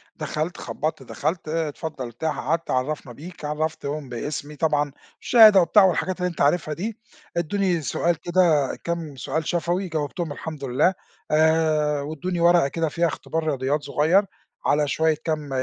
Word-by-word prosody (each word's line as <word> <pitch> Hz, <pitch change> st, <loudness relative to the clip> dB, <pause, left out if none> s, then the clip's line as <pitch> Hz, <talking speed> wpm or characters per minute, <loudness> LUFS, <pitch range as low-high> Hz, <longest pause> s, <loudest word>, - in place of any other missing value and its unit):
دخلت 155 Hz, +2 st, -3 dB
خبّطت 155 Hz, -3 st, -4 dB
دخلت 155 Hz, +7 st, -3 dB
آآ، 160 Hz, 0 st, -1 dB
اتفضل 150 Hz, -3 st, -6 dB
ارتاح 135 Hz, +7 st, -3 dB
قعدت 165 Hz, +1 st, -1 dB
عرفنا 130 Hz, 0 st, -2 dB
بيك 160 Hz, +4 st, -10 dB
عرفتهم 150 Hz, -2 st, -3 dB
باسمي 145 Hz, +4 st, -5 dB
طبعًا 150 Hz, -1 st, +1 dB, 0.3 s
الشهادة 215 Hz, -5 st, +8 dB
وبتاع 200 Hz, +4 st, +5 dB
والحاجات 185 Hz, 0 st, +1 dB
اللي 180 Hz, 0 st, 0 dB
أنت 170 Hz, -, -6 dB
عارفها 155 Hz, +1 st, +2 dB
دي، 210 Hz, +7 st, -4 dB, 0.4 s
ادوني 175 Hz, 0 st, 0 dB
سؤال 170 Hz, +4 st, 0 dB
كده 170 Hz, -6 st, +2 dB
كام 165 Hz, -4 st, -3 dB
سؤال 150 Hz, +5 st, -3 dB
شفوي 175 Hz, +2 st, 0 dB
جاوبتهم 160 Hz, +1 st, -3 dB
والحمد 155 Hz, -1 st, -7 dB
لله 135 Hz, +8 st, +2 dB, 0.4 s
آآ، 155 Hz, -2 st, +3 dB
وادوني 160 Hz, +5 st, -4 dB
ورقة 170 Hz, -3 st, +5 dB
كده 165 Hz, +2 st, -1 dB
فيها 170 Hz, +3 st, +1 dB
اختبار 160 Hz, +1 st, -3 dB
رياضيات 140 Hz, +1 st, 0 dB
صغيّر، 160 Hz, +8 st, +3 dB, 0.4 s
على 150 Hz, 0 st, +2 dB
شوية 160 Hz, +1 st, +2 dB
كام 155 Hz, -3 st, -2 dB
155 Hz, 150 wpm, -24 LUFS, 145-170 Hz, 0.4 s, الشهادة